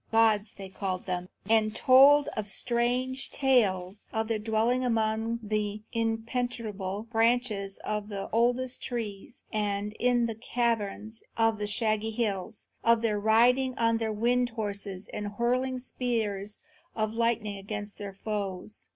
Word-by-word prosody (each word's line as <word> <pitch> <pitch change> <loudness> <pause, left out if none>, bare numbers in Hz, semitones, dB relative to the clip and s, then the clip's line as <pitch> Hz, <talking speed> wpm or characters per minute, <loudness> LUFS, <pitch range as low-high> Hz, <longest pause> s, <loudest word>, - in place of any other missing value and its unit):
Gods, 225 -2 +3
they 195 -1 -7
called 190 -1 -4
them, 180 -1 -3 0.2
and 215 -1 +3
told 280 +3 +7 0.2
strange 245 +5 0
tales 205 -8 +1
of 220 0 -2
their 225 -1 0
dwelling 225 +4 +1
among 225 -1 0
the 210 0 -2
impenetrable 225 -3 -2
branches 225 -3 +1
of 210 0 -3
the 200 -1 -4
oldest 245 +3 +1
trees 230 -1 -5
and 210 -1 -1
in 245 -1 +3
the 230 - -2
caverns 225 -2 -2 0.2
of 225 -1 +2
the 210 - -2
shaggy 215 +1 +1
hills; 215 -3 -3 0.2
of 230 0 +4
their 210 -2 +1
riding 245 +5 +3
on 230 0 +2
the 225 -1 -1
wind 240 +3 +1
horses 200 -4 -5
and 205 -1 -4
hurling 255 +4 0
spears 220 -5 -2 0.4
of 215 -1 -1
lightning 230 -3 0
against 205 +1 -6
their 200 -2 -6
foes. 200 -1 -5
220 Hz, 135 wpm, -28 LUFS, 205-235 Hz, 0.4 s, told